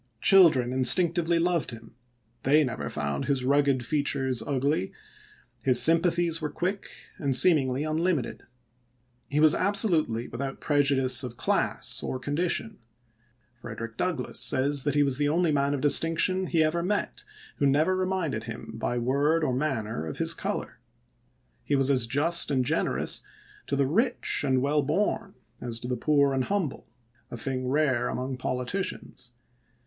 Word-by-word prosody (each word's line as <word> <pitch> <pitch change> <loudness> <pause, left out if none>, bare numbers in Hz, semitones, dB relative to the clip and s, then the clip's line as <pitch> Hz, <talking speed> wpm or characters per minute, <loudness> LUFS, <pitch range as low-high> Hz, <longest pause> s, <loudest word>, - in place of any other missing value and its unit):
Children 155 -11 +5
instinctively 170 +6 +4
loved 170 -1 0
him; 115 -1 -10 0.5
they 150 +3 +3
never 95 - -4
found 70 -2 -3
his 135 -3 -1
rugged 140 -2 +1
features 135 -4 -1
ugly; 135 -2 -1 0.7
his 130 -2 +3
sympathies 165 0 +2
were 150 - -3
quick 190 +5 -4 0.3
and 140 -5 0
seemingly 140 -4 +3
unlimited. 155 -3 -2 0.9
He 145 - -1
was 155 0 +6
absolutely 175 - +1
without 135 +3 -6
prejudice 140 -3 +2
of 120 -2 -7
class - - 0
or - - -4
con 140 +3 -5
dition. 180 +5 -2 0.8
Frederick 115 -1 -8
Douglass 165 -4 -3
says 135 +3 +1
he 145 +1 +2
was 135 -1 0
the 145 0 +1
only 170 +1 +1
man 140 -1 0
of 135 - -5
distinction 165 +5 +3
he 165 -2 +2
ever 160 +2 0
met 200 +4 -3 0.3
who 140 - +1
never 155 +7 +2
reminded 185 -11 -2
him 115 -1 -8
by 115 +2 -3
word 140 +7 +1
or 130 - 0
manner 115 - -3
of 75 - -6
his - - +2
color; - - -5 0.8
he 145 - -1
was 135 0 +2
as 125 -4 +2
just 160 +7 +2
and 130 -3 0
generous - - -1 0.4
to 140 - -1
the 140 0 +1
rich 225 - +1
and 130 -2 +1
well 145 +2 +1
born 190 +6 -2 0.3
as 115 -2 -4
to 120 - -7
the 125 - -2
poor 140 +2 +1
and 130 -1 -1
humble 195 -9 -3 0.2
— 120 0 -38
a - - -7
thing 130 +1 -4
rare 130 -3 0
among 130 +1 -4
politicians. 125 0 -5
140 Hz, 155 wpm, -26 LUFS, 125-165 Hz, 0.9 s, was